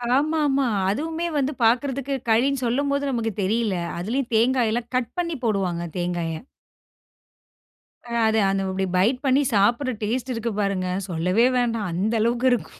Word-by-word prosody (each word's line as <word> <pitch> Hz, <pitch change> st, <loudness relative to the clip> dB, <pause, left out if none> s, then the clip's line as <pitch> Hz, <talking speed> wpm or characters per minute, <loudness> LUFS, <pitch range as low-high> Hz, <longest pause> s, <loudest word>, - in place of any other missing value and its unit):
ஆமாமா. 290 Hz, -1 st, +2 dB, 0.2 s
அதுவுமே 320 Hz, -, -2 dB
வந்து 275 Hz, 0 st, +1 dB
பார்க்குறதுக்கு 265 Hz, +4 st, +1 dB
கழினு 260 Hz, +4 st, +2 dB
சொல்லும்போது, 280 Hz, +4 st, 0 dB
நமக்கு 225 Hz, -2 st, -1 dB
தெரியல. 215 Hz, 0 st, 0 dB, 0.2 s
அதிலயும் 235 Hz, +7 st, -2 dB
தேங்காய்லாம் 235 Hz, 0 st, +1 dB
கட் 240 Hz, -, -2 dB
பண்ணி 335 Hz, -2 st, -1 dB
போடுவாங்க 185 Hz, -6 st, 0 dB
தேங்காய. 175 Hz, -2 st, -2 dB, 1.7 s
அ 235 Hz, -, -10 dB, 0.2 s
அது 220 Hz, 0 st, +2 dB, 0.3 s
இப்டி 190 Hz, 0 st, -1 dB
பைட் 215 Hz, +8 st, +3 dB
பண்ணி 270 Hz, +1 st, +4 dB
சாப்ட்ற 240 Hz, +6 st, +2 dB
டேஸ்ட் 250 Hz, +4 st, -2 dB
இருக்கு 230 Hz, 0 st, -3 dB
பாருங்க. 195 Hz, -2 st, -1 dB, 0.2 s
சொல்லவே 180 Hz, +8 st, +2 dB
வேண்டாம், 230 Hz, -5 st, 0 dB
அந்த 200 Hz, +6 st, 0 dB
அளவுக்கு 240 Hz, +3 st, +1 dB
இருக்கும். 240 Hz, -, -4 dB
235 Hz, 130 wpm, -23 LUFS, 205-270 Hz, 1.7 s, பண்ணி